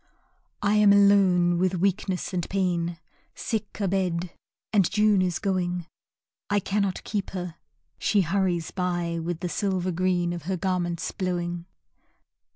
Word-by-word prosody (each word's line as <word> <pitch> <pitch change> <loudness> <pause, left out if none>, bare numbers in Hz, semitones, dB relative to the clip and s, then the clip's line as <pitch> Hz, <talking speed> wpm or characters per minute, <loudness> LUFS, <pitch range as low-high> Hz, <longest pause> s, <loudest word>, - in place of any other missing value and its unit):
I 205 +1 +3
am 210 -1 +6
alone 190 -4 +5
with 185 0 +1
Weakness 190 0 -1
and 175 -2 -2
Pain, 175 -3 0 0.4
Sick 220 -2 -4
abed 185 -3 0 0.4
and 195 -5 +4
June 210 -2 +3
is 180 -2 0
going, 180 -3 -1 0.6
I 205 0 +3
cannot 200 -1 -1
keep 205 -3 -3
her, 175 -2 -5 0.4
she 205 - +3
hurries 175 -2 0
by 175 -2 -1
With 170 0 -4
the 180 - -1
silver 185 +1 -1
green 175 0 +1
of 170 -3 -7
her 190 - 0
garments 175 -2 -1
blowing. 175 -2 -3
185 Hz, 135 wpm, -26 LUFS, 175-195 Hz, 0.6 s, am